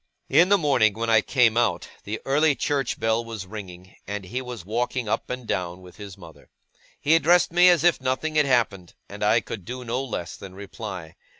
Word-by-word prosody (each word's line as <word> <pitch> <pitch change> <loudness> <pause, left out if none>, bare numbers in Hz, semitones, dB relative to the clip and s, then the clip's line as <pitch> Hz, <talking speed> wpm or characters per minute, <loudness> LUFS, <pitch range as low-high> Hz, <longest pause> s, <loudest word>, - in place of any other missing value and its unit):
In 175 +3 +5
the 200 - +5
morning, 130 - +2
when 115 +1 -1
I 110 -1 +5
came 120 -2 +2
out, 120 0 +1 0.2
the 110 +2 -4
early 145 +2 +3
church 140 -1 -1
bell 115 +1 +1
was 115 -4 -7
ringing, 95 -3 -10
and 100 -1 -5
he 125 +8 -4
was 125 -7 -8
walking 120 +3 -2
up 105 - -2
and 125 -1 -5
down 90 -3 -3
with 90 -1 -15
his 100 -3 -10
mother. 85 -4 -15 0.5
He 155 - +2
addressed 165 +1 +4
me 175 +1 +7
as 170 -4 +3
if 175 -5 +3
nothing 130 +5 -1
had 150 -2 +3
happened, 110 -9 0
and 105 +1 -7
I 110 +3 +3
could 100 - -7
do 125 +5 -7
no 120 +3 -2
less 95 -10 -5
than 95 -1 -11
reply. 95 -4 -8
115 Hz, 205 wpm, -24 LUFS, 100-135 Hz, 0.5 s, me